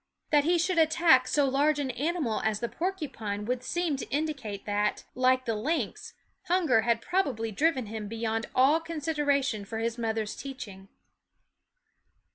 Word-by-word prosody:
That 295 -2 +4
he 345 +2 +3
should 345 +1 +1
attack 315 -5 +5
so 285 0 +2
large 285 +3 +2
an 275 -3 -1
animal 285 -2 -1
as 220 -1 0
the 235 - -2
porcupine 265 - -4
would 250 +2 -1
seem 345 -1 -1
to - - -6
indicate 275 -9 -3
that, 205 0 0
like 255 0 +2
the 230 - 0
lynx, 275 +11 -3 0.3
hunger 340 -10 +3
had 230 0 +1
probably 270 - 0
driven 275 +2 +1
him 215 0 -6
beyond 225 +1 -2
all 275 +5 +5
consideration 295 -7 -1
for 220 +3 -6
his 230 +1 -2
mother's 220 -2 -2
teaching. 205 -8 -8
260 Hz, 150 wpm, -28 LUFS, 225-315 Hz, 0.3 s, attack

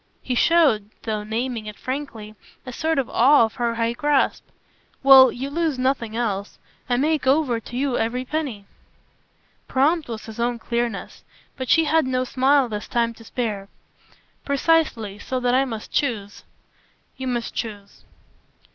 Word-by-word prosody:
He 255 - -2
showed, 255 -8 +3
though 215 -2 -2
naming 225 +1 -3
it 210 - -8
frankly, 255 -6 -6 0.3
a 255 - -7
sort 320 +4 -1
of 270 - 0
awe 260 0 +5
of 220 - -7
her 235 -2 0
high 230 0 0
grasp. 290 +1 +1 0.6
"Well, 265 -1 +9
you 270 +3 -5
lose 320 -3 0
nothing 255 -4 -1
else. 205 -4 -2 0.3
I 245 - +2
make 300 +1 0
over 265 -4 +2
to 240 +2 -8
you 270 -2 0
every 245 +3 -1
penny." 260 -9 -4 1.0
Prompt 295 +3 +1
was 225 -2 -6
his 220 0 -10
own 240 0 0
clearness, 235 -2 -3 0.3
but 260 -3 -5
she 325 - +5
had 315 -2 +2
no 255 0 0
smile 265 +1 +2
this 210 -2 -5
time 235 -1 0
to 230 - -15
spare. 215 -5 -4 0.7
"Precisely 280 -8 +1
so 255 +4 -3
that 245 0 +1
I 265 +2 +3
must 225 -4 -7
choose." 215 -8 -2 0.7
"You 260 -1 -5
must 240 -2 -2
choose." 205 -3 -7
245 Hz, 155 wpm, -23 LUFS, 225-275 Hz, 1.0 s, Well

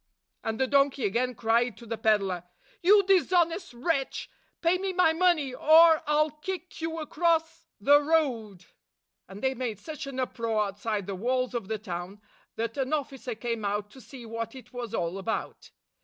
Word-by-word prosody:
" - - -52
And 220 0 -3
the 265 - +3
donkey 275 -2 +2
again 245 +5 0
cried 230 0 +1
to 235 - -12
the 230 0 -3
peddler, 200 -5 +1 0.4
"You 400 +3 +6
dishonest 360 -2 +2
wretch! 270 +1 -2 0.3
Pay 345 +2 +3
me 385 0 -2
my 360 -3 +4
money, 325 -6 +2
or 320 +4 +6
I 300 - +1
'll 305 - -5
kick 365 -2 -6
you 325 0 -3
across 325 0 0
the 285 +7 +6
road! 250 - 0 0.3
" - - -58
And 195 +2 -10
they 265 0 +2
made 235 -5 -4
such 305 +4 -7
an 265 -1 -5
uproar 230 -4 0
outside 205 0 -3
the 200 - -4
walls 255 +6 -1
of 235 -5 -3
the 220 +1 -2
town 185 -1 -6 0.4
that 230 +2 -3
an 270 +2 -1
officer 270 -5 -3
came 230 0 -3
out 205 +1 -2
to 260 - -14
see 250 -1 -11
what 230 +1 -5
it 260 - -13
was 240 -2 -5
all 175 +1 -2
about. 220 +3 -4
255 Hz, 185 wpm, -28 LUFS, 220-315 Hz, 0.4 s, You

